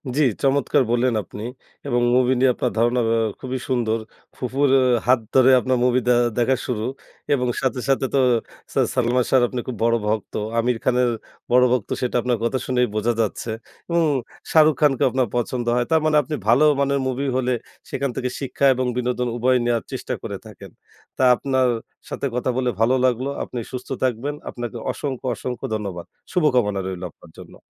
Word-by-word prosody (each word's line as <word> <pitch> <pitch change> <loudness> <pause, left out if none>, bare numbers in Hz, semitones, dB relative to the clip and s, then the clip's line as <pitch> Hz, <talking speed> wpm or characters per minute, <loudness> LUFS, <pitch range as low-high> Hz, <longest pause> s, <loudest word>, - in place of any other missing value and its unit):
জ্বী, 150 - +3 0.2
চমৎকার 135 -1 +3
বললেন 120 +1 +2
আপনি 105 - -9 0.4
এবং 120 -2 +1
movie 130 0 +3
নিয়ে 130 0 +5
আপনার 125 - -1
ধারণা 120 +2 +2
আ - - +3 0.2
খুবই 130 0 -4
সুন্দর। 115 -3 +1 0.4
ফুফুর 135 +2 0 0.4
হাত 130 -1 +5 0.2
ধরে 130 0 +6
আপনার 130 0 0
movie 125 0 +2
দে 125 - +5 0.3
দেখা 130 +2 +3
শুরু 110 -3 -2 0.5
এবং 125 -2 +1
সাথে, 130 -1 0
সাথে 135 0 +2
তো 140 - +3 0.5
সা - - +1 0.2
সালমান 125 0 +2
সাহর 130 -2 +4
আপনি 125 - -4
খুব 125 -3 -4
বড় 115 0 +3
ভক্ত। 110 -1 -2 0.3
আমির 120 0 +1
খানের 125 -1 +2 0.4
বড় 125 +1 +6
ভক্ত 125 -4 0
সেটা 125 -1 -2
আপনার 125 -2 0
কথা 125 +3 0
শুনেই 125 -1 +2
বোঝা 115 +3 +1
যাচ্ছে 110 +1 -2 0.4
এবং 170 0 +2 0.5
শাহরুখ 155 -1 +5
খানকে 135 -4 +3
আপনার 130 0 0
পছন্দ 120 0 -1
হয়। 120 0 +1
তারমানে 155 -1 +3
আপনি 150 +3 -4
ভালো 120 +6 +5 0.2
মানের 140 0 +1
movie 130 +2 -2
হলে 125 -1 0 0.4
সেখান 140 -1 -2
থেকে 125 - -2
শিক্ষা 140 0 -1
এবং 130 0 -1
বিনোদন 125 0 -1
উভয় 130 +2 +3
নেয়ার 120 -2 +1
চেষ্টা - - -4
করে - - -4
থাকেন। - - -12 0.5
তা 130 - +1
আপনার 130 -1 +1 0.4
সাথে - - -4
কথা 125 +1 -1
বলে 125 -1 +1
ভালো 120 +4 +3
লাগলো। 130 +2 +1
আপনি 125 - -6
সুস্থ 125 -1 -7
থাকবেন, 130 +4 -1
আপনাকে 120 0 -6
অসংখ্য, 135 -3 -5
অসংখ্য 125 +2 -5
ধন্যবাদ। 95 -5 -5 0.3
শুভকামনা 125 - +2
রইলো 90 -1 -5
আপনার 80 - -18
জন্য। - - -12
125 Hz, 175 wpm, -22 LUFS, 120-130 Hz, 0.5 s, ধরে